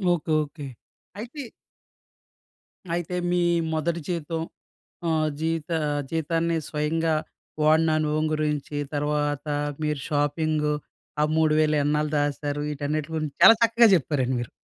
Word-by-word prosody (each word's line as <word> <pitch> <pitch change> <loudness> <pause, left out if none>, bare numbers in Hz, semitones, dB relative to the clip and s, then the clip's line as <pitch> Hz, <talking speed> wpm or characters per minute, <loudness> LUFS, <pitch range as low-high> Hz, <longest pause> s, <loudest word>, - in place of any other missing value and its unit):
Okay. 160 -1 -5
Okay. 145 0 -9 0.6
అయితే 255 +6 -7 1.5
అయితే, 175 +1 -3 0.2
మీ 180 - +2 0.3
మొదటి 165 +2 -1
జీతం 165 -1 -2 0.7
ఆహ్, 155 -1 +1
జీవిత 165 0 -2 0.4
జీతాన్ని 165 +1 0
స్వయంగా 160 +2 0 0.5
వాడిన 155 +1 +4
అనుభవం 155 0 0
గురించి, 150 -1 -2 0.2
తర్వాత 145 0 -1 0.4
మీర 150 0 0
షాపింగూ, 150 0 0 0.5
ఆ - - +4
3000 155 -1 +3
ఎన్నాళ్ళు 150 +1 0
దాశారు, 145 0 -1
ఈటన్నిట్లి 150 +2 -3
గురించి 155 -2 -3
చాలా 225 +4 +10
చక్కగా 230 0 +6
చెప్పారండి 130 -4 0
మీరు. 120 - -5
155 Hz, 110 wpm, -25 LUFS, 150-165 Hz, 1.5 s, చాలా